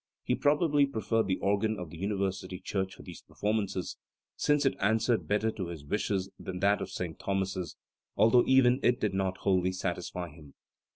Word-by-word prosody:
He - - 0
probably 145 -1 +3
pre 110 -6 -5
ferred 110 +1 +1
the 95 - +1
organ 105 +2 +1
of 90 -5 -7
the 85 - -9
University 95 -2 -2
church 95 -1 -3
for - - -13
these - - -10
per - - -23
formances, 100 -3 -1 0.4
since 145 -1 +2
it 135 - +3
answered 110 +3 +1
better 105 +2 +1
to 95 -5 -5
his 80 -4 -8
wishes 95 +2 -1
than 90 - -5
that 100 +1 +3
of - - -4
St. 90 -3 -5
Thomas's, 95 -4 -2 0.4
although 120 +2 +5
even 130 -1 +5
it 125 - +3
did 105 -2 0
not 95 -1 -1
wholly 95 -1 +1
satisfy 90 -1 -4
him. 75 -2 -15
100 Hz, 185 wpm, -30 LUFS, 95-110 Hz, 0.4 s, although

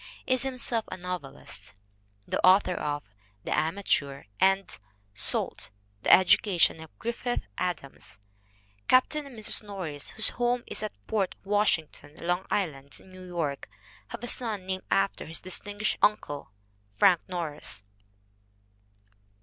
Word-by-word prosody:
is 255 -1 +1
himself 250 -3 0
a - - -4
novelist, 180 - -7 0.5
the - - -1
author 185 0 +6
of 145 -3 -2 0.4
The - - -1
Amateur 155 -4 0 0.2
and 195 0 +3 0.4
Salt: 105 - +3 0.3
The - - +3
Education 185 -3 +5
of 160 -1 -13
Griffith 240 +1 -2 0.2
Adams. 175 -7 -4 0.7
Captain 285 +3 +3
and 255 -4 -12
Mrs. 215 - +3
Nor 200 -3 -6
ris, 145 -3 -3
whose 220 - +5
home 245 0 0
is - - -3
at 215 -1 -3
Port 205 -4 0
Washington, 190 -7 0
Long 175 +2 -1
Island, 140 -8 -2
New 185 -1 -12
York, 160 -6 -3 0.4
have - - -8
a - - -3
son 220 -6 0
named 190 0 -3
after 195 -3 +1
his 165 - -5
distinguished 205 +3 -2
uncle, 145 -11 +1 0.5
Frank 180 - +6
Norris. 155 - -4
185 Hz, 125 wpm, -28 LUFS, 160-210 Hz, 0.7 s, author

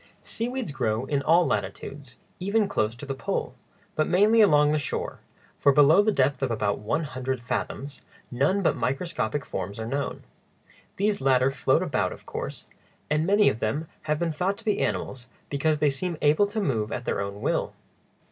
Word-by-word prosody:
Seaweeds 240 - -3
grow 110 -3 -1
in 140 0 0
all 165 +4 +4
latitudes, 135 -3 -4 0.2
even 200 +3 +1
close 110 - 0
to 140 +4 -9
the 135 - -3
pole, 135 - -3 0.4
but 155 - +1
mainly 210 +5 +5
along 150 -7 +5
the 155 - +2
shore, 150 - -4 0.4
for 140 - +5
below 150 +6 +6
the 215 +1 +2
depth 140 -5 +1
of 135 - 0
about 105 -3 0
one 110 +10 -1
hundred 130 -2 -3
fathoms 135 +3 -4 0.3
none 145 +11 +1
but - - +3
microscopic 135 +1 -2
forms 100 +4 -5
are 110 - -3
known. 140 +3 -3 0.7
These 205 +1 0
latter 130 0 +3
float 130 -2 +2
about, - - 0
of - - -15
course, - - -6 0.5
and 155 +2 +2
many 205 +1 +5
of 110 - +1
them 145 +10 -1 0.2
have 150 - +2
been 170 +1 -1
thought 185 +6 -1
to 230 - -12
be 210 - +1
animals 125 -2 -2 0.2
because 150 +2 +1
they 150 -1 +2
seem 170 +4 -3
able 155 +8 +4
to 215 +2 -3
move 115 - -1
at 120 - -4
their - - -1
own 100 +1 -5
will. - - -1
145 Hz, 185 wpm, -26 LUFS, 130-180 Hz, 0.7 s, below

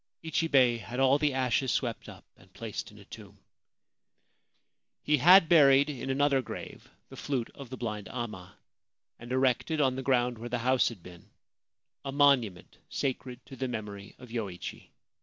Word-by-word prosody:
Ichibei 140 -7 +2
had 120 +4 -7
all 135 +2 +4
the 150 -1 +2
ashes 130 -1 +1
swept - - -2
up - - -13
and - - -22
placed - - -6
in - - -17
a - - -15
tomb. - - -13 1.7
He 150 0 +2
had 175 +4 +7
buried 145 -3 +5
in 135 -1 -6
another 140 0 +2
grave 125 - -9 0.2
the - - -11
flute 130 -5 -3
of 140 -3 -11
the 130 - -7
blind 105 -4 -5
amma, 105 -7 -7 0.6
and 120 +1 -10
erected 130 +4 +1
on 130 -3 +2
the - - -3
ground 125 -3 +1
where 120 +1 -7
the 125 - -1
house 130 +2 +2
had 105 -8 -12
been 90 -1 -14 0.7
a 135 - -4
monument 135 - +2
sacred 130 -2 -4
to 135 - -11
the 130 0 -3
memory 105 -4 -7
of 125 - -13
Yoichi. 100 -7 -6
130 Hz, 165 wpm, -29 LUFS, 115-140 Hz, 1.7 s, had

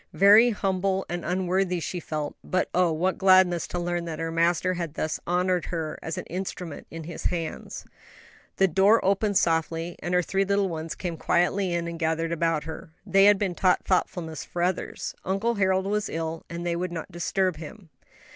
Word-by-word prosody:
Very 210 +5 +7
humble 195 -2 0
and 175 0 -3
unworthy 180 0 0
she 180 +2 -4
felt; 155 -3 -4
but 185 - -1
oh, 180 -2 +3
what 180 +4 0
gladness 185 -3 +5
to - - -4
learn 175 0 -2
that 165 -2 -5
her 165 0 -3
Master 170 +2 +2
had 170 -4 -4
thus 155 0 -2
honored 180 0 +1
her 160 -3 -4
as 160 - -4
an - - -5
instrument 180 -3 -6
in 165 0 -7
His 160 +1 -8
hands. 170 -3 -3 0.7
The 195 - +4
door 195 +6 +4
opened 200 +1 +2
softly, 165 +1 0
and 175 +1 -1
her 180 - +3
three 195 +3 0
little 200 0 +1
ones 160 -1 -5
came 175 -3 -4
quietly 180 +3 +1
in 170 0 -1
and 170 -1 -6
gathered 165 0 0
about 165 -2 0
her. 160 +1 -8 0.2
They 195 0 +5
had 205 0 +7
been 195 -3 -1
taught 180 +1 +2
thoughtfulness 170 -3 -1
for 175 - -3
others: 180 +1 -2
Uncle 195 +5 0
Harold 190 -2 +1
was 210 +1 -1
ill, 165 0 -4
and 170 +1 -5
they 170 -1 0
would 180 +1 -3
not 170 +2 -6
disturb 180 0 0
him. 165 +4 -10
175 Hz, 190 wpm, -26 LUFS, 165-190 Hz, 0.7 s, Very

